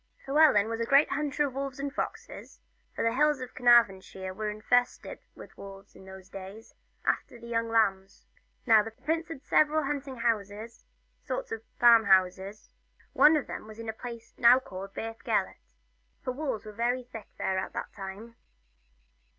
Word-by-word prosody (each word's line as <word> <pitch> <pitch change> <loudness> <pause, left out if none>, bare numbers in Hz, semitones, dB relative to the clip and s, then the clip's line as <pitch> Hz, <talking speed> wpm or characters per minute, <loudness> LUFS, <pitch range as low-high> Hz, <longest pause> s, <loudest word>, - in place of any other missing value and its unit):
Llewellyn 275 -8 +5
was 225 0 -4
a - - 0
great 280 +2 +4
hunter 295 +1 0
of 270 - -5
wolves 275 -1 -5
and 280 0 -4
foxes, 455 +2 -6 0.4
for - - -2
the 230 0 +1
hills 300 +2 +2
of 255 - -8
Carnarvonshire 195 -6 +2
were 215 +2 -3
infested 245 +4 0 0.2
with - - -13
wolves 195 0 -12
in 190 - -14
those 190 -1 -12
days, 195 +3 -10 0.3
after - - -1
the 235 - -12
young 230 -1 -2
lambs. 195 -4 0 0.4
Now 225 -3 +6
Prince 320 +10 -3
Llewellyn 325 -5 -7
had - - -40
several 310 +1 +3
hunting 275 -1 -4
houses 225 -1 -3 0.4
sorts - - -5
of 225 - -4 0.2
farm 230 -2 +7
houses 190 +1 +1 0.3
and - - -31
one 310 +1 +7
of 290 - -3
them - - -8
was 215 +1 -12
at 230 - -7
the 220 - -4
place 235 0 -9
now 240 +1 +7
called 195 -7 -8
Beth 225 0 -6
Gelert, 60 0 -2 0.5
for - - -2
the - - -14
wolves 265 -8 -3
were 215 - -8
very 240 +4 -1
thick 235 -3 -10
about - - -38
there 190 0 -1
at 190 - -5
the - - -3
time. 205 +4 -9
230 Hz, 185 wpm, -28 LUFS, 200-265 Hz, 0.5 s, farm